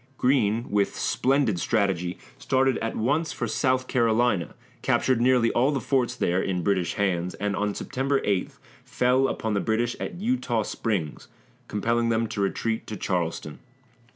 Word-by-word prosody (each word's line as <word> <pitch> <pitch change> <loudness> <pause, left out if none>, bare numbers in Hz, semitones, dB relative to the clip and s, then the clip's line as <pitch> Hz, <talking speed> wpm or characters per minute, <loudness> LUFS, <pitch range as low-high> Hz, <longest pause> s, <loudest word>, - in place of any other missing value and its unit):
Greene, 120 -3 +2
with 100 -1 +1
splendid 135 -8 +1
strategy, 95 -4 0 0.2
started 130 -1 +1
at 115 - -3
once 145 +8 0
for 120 - -3
South 130 +3 +1
Carolina, 115 -7 +1 0.3
captured 130 -3 +2
nearly 125 -2 +4
all 125 +4 +2
the 140 -2 0
forts 125 0 0
there 90 -6 +1
in 90 -2 -2
British 95 -3 0
hands, 90 -3 -1
and 105 0 -2
on 105 0 -1
September 135 +1 -1
8 100 -3 0 0.3
fell 130 +2 +2
upon 110 -4 -2
the 100 - +1
British 115 +3 0
at - - -5
Eutaw 200 - 0
Springs, 95 -10 -3 0.4
compelling 115 +3 0
them 115 0 +1
to 100 - -3
retreat 110 +3 -1
to 110 - -5
Charleston. 85 -5 -2
115 Hz, 155 wpm, -26 LUFS, 100-130 Hz, 0.4 s, nearly